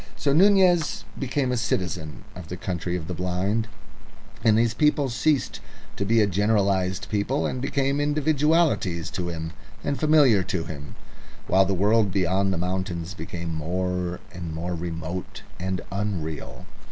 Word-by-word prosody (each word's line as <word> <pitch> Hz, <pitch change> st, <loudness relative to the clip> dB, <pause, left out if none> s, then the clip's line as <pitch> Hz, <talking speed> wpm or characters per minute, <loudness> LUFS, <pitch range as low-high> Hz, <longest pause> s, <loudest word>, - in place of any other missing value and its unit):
So 140 Hz, -, +1 dB
Nunez 180 Hz, -2 st, +4 dB, 0.2 s
became 130 Hz, 0 st, 0 dB
a 125 Hz, -, 0 dB
citizen 90 Hz, -, -2 dB
of 90 Hz, -2 st, -9 dB
the 90 Hz, -, -6 dB
Country 90 Hz, -1 st, -3 dB
of 80 Hz, -2 st, -7 dB
the 90 Hz, -, -3 dB
Blind, 90 Hz, +6 st, -1 dB, 0.8 s
and 110 Hz, -2 st, +5 dB
these 115 Hz, -1 st, +3 dB
people 150 Hz, -2 st, +2 dB
ceased 130 Hz, +4 st, +1 dB, 0.4 s
to 100 Hz, -, -2 dB
be 115 Hz, +2 st, +4 dB
a -, -, +5 dB
generalised 100 Hz, -1 st, +1 dB
people 105 Hz, +7 st, 0 dB
and 130 Hz, -, -2 dB
became 140 Hz, +1 st, 0 dB
individualities 150 Hz, -, +2 dB, 0.7 s
and 140 Hz, -, -1 dB
familiar 150 Hz, -9 st, +5 dB
to 90 Hz, -2 st, -2 dB
him, 75 Hz, -3 st, -8 dB, 0.5 s
while 95 Hz, 0 st, +4 dB
the 95 Hz, +1 st, 0 dB
world 105 Hz, +2 st, +3 dB
beyond 95 Hz, +1 st, +1 dB
the 95 Hz, -, -1 dB
mountains 90 Hz, -1 st, -2 dB
became 85 Hz, -1 st, -5 dB
more 90 Hz, +2 st, -2 dB
and 85 Hz, -3 st, -6 dB
more 85 Hz, +2 st, -3 dB
remote 85 Hz, +1 st, -5 dB, 0.2 s
and 95 Hz, 0 st, -2 dB
unreal. 95 Hz, -6 st, -4 dB
95 Hz, 140 wpm, -25 LUFS, 90-125 Hz, 0.8 s, and